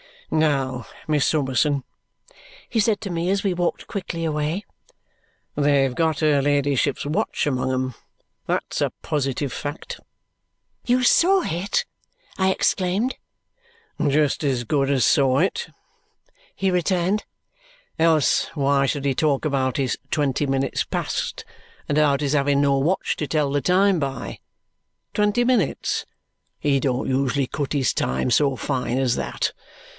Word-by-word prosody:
"Now, 135 -5 +1 0.2
Miss 150 -3 +2
Summerson," 140 -1 +1 0.9
he 225 - 0
said 210 -1 +2
to 200 - -5
me 170 +1 -1
as 195 +1 +1
we 195 -3 +1
walked 175 -1 -2
quickly 170 -4 -4
away. 155 +5 -1 0.9
"They've 140 -2 +2
got 160 +1 0
her 150 -3 +3
ladyship's 145 -1 +1
watch 150 +2 -1
among 130 -2 0
'em. 130 0 -1 0.5
That's - - -2
a - - 0
positive 140 -2 -1
fact." 145 +4 -6 0.9
"You 250 +1 +2
saw 370 +8 +4
it?" 195 - -1 0.5
I 190 0 +2
exclaimed. 190 +6 0 0.9
"Just 145 +1 +2
as 130 -4 0
good 135 +3 0
as 135 -5 +3
saw 135 +1 +3
it," 330 - 0 0.9
he 195 -1 0
returned. 180 +3 +1 0.7
"Else 160 -3 +3
why 140 -1 +2
should 140 +1 -1
he 140 -1 +1
talk 140 0 +1
about 135 -4 0
his 135 -3 0
'twenty 145 -1 0
minutes 135 0 0
past' - - -3 0.5
and 145 - +1
about 145 -2 +3
his 145 -1 0
having 140 -1 +2
no 140 -1 +3
watch 160 +8 0
to 150 - -3
tell 150 -2 0
the 145 0 +1
time 190 +2 +3
by? 135 -2 -4 0.7
Twenty 210 +3 +2
minutes! 240 - 0 0.5
He 140 -2 +1
don't 130 -1 -1
usually 135 0 +1
cut 145 +1 -3
his 140 -3 +1
time 65 - -1
so 140 +1 +3
fine 130 -2 -2
as 130 -3 +1
that. - - -2
145 Hz, 140 wpm, -23 LUFS, 135-175 Hz, 0.9 s, saw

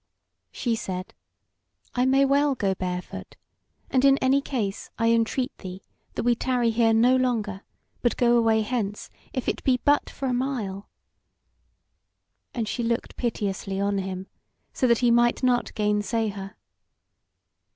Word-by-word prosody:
She 235 -2 -1
said: 185 -3 -5 0.8
"I 250 +1 +2
may 270 +1 +4
well 280 0 +3
go 200 -5 0
barefoot. 180 -1 -5 0.6
And 260 -1 +3
in 275 0 +6
any 270 +1 +3
case, 225 -8 -3
I 230 0 +2
entreat 230 +3 0
thee 185 0 -8 0.3
that - - -2
we 240 0 +4
tarry 245 -1 +1
here 225 0 +3
no 240 +3 +5
longer, 225 -6 0 0.4
but 240 - +1
go 240 -1 +4
away 225 -2 +3
hence, 210 -3 -3 0.2
if 255 - -4
it - - -1
be 255 -2 +2
but 290 0 +3
for 275 - -6
a 250 - 0
mile." 240 -7 -3 1.6
And 230 -3 -3
she 240 - -2
looked 235 +1 -2
piteously 200 -4 -2
on 200 0 0
him, 190 0 -4 0.5
so 255 - +1
that 235 -1 +4
he 240 - +5
might 240 +2 +3
not 250 -1 +2
gainsay 210 +1 0
her. 195 -1 -7
230 Hz, 150 wpm, -25 LUFS, 205-255 Hz, 1.6 s, in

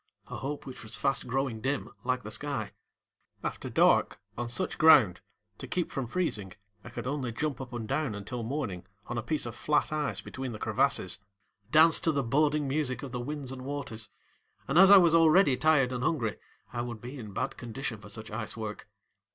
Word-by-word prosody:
a - - -5
hope 145 +2 -5
which 130 -1 -8
was 110 0 -5
fast 135 -2 0
growing 125 -3 -1
dim 135 +4 -1 0.2
like 125 -1 -1
the 110 - -7
sky. 145 +4 -3 0.7
After - - -4
dark, - - +3 0.2
on 120 0 -3
such 120 - -1
ground, 135 - +6 0.4
to - - -7
keep 180 -2 -2
from 135 -6 -3
freezing, 110 - -1 0.3
I - - -9
could 120 - -6
only 130 -2 -2
jump 140 +3 -3
up 125 -2 -8
and 120 -3 -5
down 135 -4 -1
until 105 +4 -5
morning 110 -8 -4 0.2
on 120 0 -3
a - - -2
piece 155 +5 0
of 120 - -5
flat 150 +6 +1
ice 150 -2 -1
between 130 -2 -6
the - - -6
crevasses, - - +1 0.5
dance 155 +1 +6
to 165 - +1
the 140 -2 0
boding 145 +3 +2
music 135 -1 -1
of 135 - -6
the 125 - -3
winds 140 0 -5
and 130 -1 -7
waters, 130 -6 -6 0.6
and 145 +5 +3
as 190 0 +9
I 200 - +11
was 170 -3 +5
already 165 -3 +6
tired 135 -4 +3
and 125 0 -3
hungry 120 -8 0 0.3
I 120 - -2
would 120 -2 -5
be 125 +5 -8
in 110 -4 -8
bad - - -3
condition 120 -1 -5
for 105 - -12
such 110 +1 -8
ice 110 0 -4
work. 105 -2 -6
130 Hz, 200 wpm, -29 LUFS, 115-150 Hz, 0.7 s, I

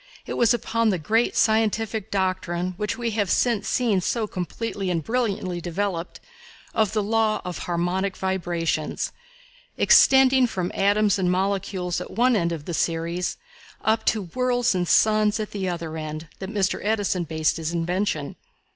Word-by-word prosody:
It - - -5
was 235 -2 +3
upon 230 -1 +1
the 190 - +1
great 220 +9 +1
scientific 220 -1 +1
doctrine, 185 -2 -1
which 210 +1 -2
we 235 -2 -2
have 205 -3 0
since 230 -5 +1
seen 225 -7 +1
so 225 +4 -1
completely 195 +1 -4
and 165 -3 -1
brilliantly 200 -7 -1
developed, 175 0 -3 0.5
of 215 -3 +1
the 215 -2 +1
law 220 0 +1
of 180 -1 -5
harmonic 180 +3 -1
vibrations, 175 -4 -2 0.7
extending 265 -1 +6
from 185 -5 -3
atoms 205 0 +2
and 180 -1 +1
molecules 190 -1 -1
at - - -7
one 245 +3 +2
end 170 -4 +1
of 160 -3 -5
the 175 - -4
series 170 +2 -1 0.5
up 220 0 +2
to 215 -2 +1
worlds 250 -2 +1
and 180 -1 -1
suns 215 +2 +3
at 215 - -4
the 190 -2 -2
other 165 -2 -4
end, 155 0 -6
that 190 - -5
Mr. 200 -3 0
Edison 205 -4 0
based 160 0 0
his 160 0 -3
invention. 170 -3 -2
195 Hz, 155 wpm, -24 LUFS, 175-220 Hz, 0.7 s, extending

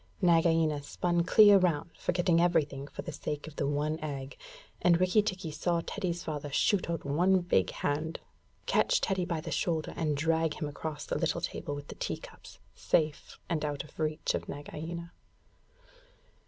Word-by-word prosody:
Nagaina 165 -4 +3
spun 175 +4 0
clear 205 +2 +7
round, 170 -3 0
forgetting 175 -1 +2
everything 145 -5 +1
for - - -7
the 170 - -5
sake 150 -1 -4
of 155 -1 -10
the 140 - 0
one 150 +2 -1
egg; 140 -3 -5 0.5
and 170 -1 +4
Rikki 185 +4 +4
tikki 185 -5 -3
saw 170 +2 0
Teddy's 180 -4 -3
father 150 -2 -4
shoot 185 +5 +2
out 165 -3 -3
a 150 +6 +1 0.2
big 95 - +2
hand, 155 +3 -2 0.5
catch - - +3
Teddy 190 -2 0
by 170 -3 -2
the 165 - -6
shoulder, 160 +1 -1
and 155 -3 0
drag 160 +1 +1
him 150 - -3
across 145 0 -5
the - - -2
little - - 0
table 145 - -4
with 145 0 -9
the - - -5
tea - - -3
cups, - - -13 0.2
safe 155 -2 0
and 165 -3 -1
out 145 -2 -2
of 150 - -17
reach 155 -1 0
of - - -4
Nagaina. 165 +4 -6
160 Hz, 170 wpm, -30 LUFS, 150-175 Hz, 0.5 s, clear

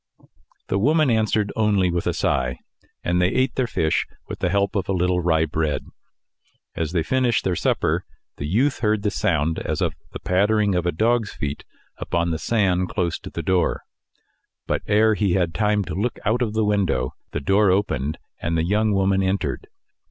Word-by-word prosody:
The 95 - +1
woman 150 +4 +3
answered 110 -2 +1
only 100 -5 +2
with 85 0 -2
a - - +1
sigh, 60 0 0 0.5
and 90 +1 +1
they 90 - +4
ate 130 +5 +1
their 130 -2 0
fish 80 -8 0 0.2
with - - -6
the 90 - 0
help 100 +2 +1
of 95 -2 -1
a - - +2
little 90 0 +1
rye 80 -2 +2
bread. 80 -1 -2 0.9
As 80 -1 -3
they 85 -3 0
finished 125 +4 +1
their 90 - 0
supper, - - 0 0.3
the 70 - -4
youth 125 - +1
heard 105 -2 +1
the 105 - +1
sound 80 -3 0
as - - -3
of - - 0 0.2
the - - -7
pattering 105 +2 +2
of 90 -1 0
a - - +2
dog's 110 +5 +1
feet 70 0 -4 0.3
upon 85 0 -1
the 80 - -2
sand 95 -5 +1
close 90 -4 -1
to - - -9
the 85 - -5
door; 90 +2 +1 0.8
but - - -1
ere 110 +1 +4
he 100 -3 +1
had 85 -3 +1
time 105 -1 +1
to - - -6
look 110 +6 -2
out 115 +4 +1
of 110 -3 0
the 110 -1 +1
window, 100 -4 0 0.2
the - - -2
door 95 +7 +3
opened, 80 -7 0 0.2
and 85 0 -1
the 80 - +1
young 105 +3 +2
woman 95 0 +2
entered. 95 +1 -1
95 Hz, 190 wpm, -23 LUFS, 85-105 Hz, 0.9 s, they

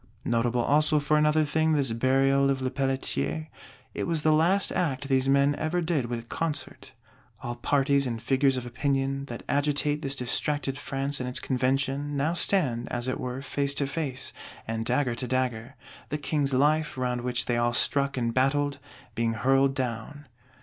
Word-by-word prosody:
Notable 120 +1 +1
also 150 +2 +3
for 150 +1 +1
another 150 +1 +3
thing 160 +2 +1
this 140 -5 +1
Burial 135 +3 +3
of 135 -1 +1
Lepelletier; 135 +4 -2 0.4
it - - -3
was 165 -3 0
the 155 - +4
last 175 +6 +2
act 140 -5 -1
these 135 0 +2
men 140 +1 +4
ever 155 +3 -1
did 160 -7 0
with 120 -1 -5
concert! 165 +2 -4 0.5
All 120 0 -3
parties 140 +2 +2
and 115 -2 -3
figures 135 +2 +2
of 125 - -4
Opinion, 135 +2 -1
that 120 -4 -8
agitate 145 +1 +1
this 140 -2 0
distracted 135 +2 -1
France 145 -1 -3
and 125 0 -3
its 125 - -2
Convention, 135 +2 0
now 150 +4 +1
stand, 145 -10 +1
as 120 0 -2
it 130 - -2
were, 125 +1 -4
face 140 +1 0
to 140 - 0
face, 135 -3 -3 0.3
and 115 0 -2
dagger 125 0 +1
to 125 +2 -4
dagger; 130 0 -2 0.3
the 150 - -1
King's 145 -1 0
Life, 150 +2 +2
round 125 -1 -1
which 125 0 -1
they 120 - 0
all 120 0 +2
struck 140 +2 +1
and 115 -2 0
battled, 140 +2 +1 0.3
being 115 0 0
hurled 135 +3 +2
down. 130 +3 -4
135 Hz, 170 wpm, -27 LUFS, 125-145 Hz, 0.5 s, the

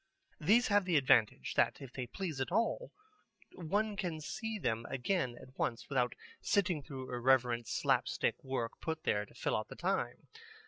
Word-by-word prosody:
These 220 +10 +4
have 205 -2 +4
the 175 -4 +3
advantage 130 -6 +3
that - - +2
if 135 -3 -10
they 125 -2 -4
please 155 - -4
at 130 - -2
all, 230 - 0 0.6
one 205 +5 -1
can 180 -6 -2
see 220 +8 -4
them 115 - -1
again 130 -2 -1
at 130 - -14
once 115 0 -1
without 125 -3 +1 0.3
sitting 180 -6 +2
through 130 -2 -7
irrelevant 120 -2 +3
slapstick - - +1
work 130 -3 -2
put 160 -1 -3
there 105 0 +1
to - - -20
fill - - 0
out - - -2
the - - -9
time. - - -2
140 Hz, 170 wpm, -34 LUFS, 125-190 Hz, 0.6 s, These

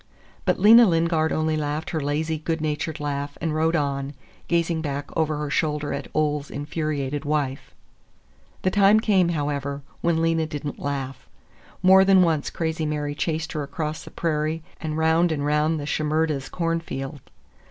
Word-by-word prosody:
But - - +1
Lena 230 +2 +8
Lingard 165 -2 +2
only 155 0 0
laughed 150 +1 -2
her 160 - -1
lazy, 155 +2 -1
good 160 +1 -2
natured 155 +1 -2
laugh 145 -1 -3
and 160 -2 -1
rode 160 +2 +1
on, 140 -2 -1 0.3
gazing 170 -1 +1
back 145 -2 -4
over 155 -2 +1
her 150 -1 -3
shoulder 150 -1 0
at - - -4
Ole's 150 -2 0
infuriated 145 -1 -3
wife. 145 -3 -2 0.9
The 185 - +2
time 205 +1 +5
came, 195 -5 +3
however, 145 -3 -2 0.2
when 170 -1 +2
Lena 165 -1 +1
did 150 -2 -6
n't 145 - -5
laugh. 135 -2 -4 0.5
More 190 +1 +7
than 190 -1 +6
once 160 -4 +1
Crazy 160 -1 -2
Mary 150 -1 -2
chased 160 +1 -2
her 155 - -3
across 150 +2 -4
the - - -10
prairie 155 0 -1 0.2
and 155 -1 -3
round 160 +2 +3
and 145 -2 -1
round 150 +2 +1
the 145 - -5
Shimerdas' 155 -2 0
cornfield. 165 -5 -3
155 Hz, 165 wpm, -24 LUFS, 145-165 Hz, 0.9 s, Lena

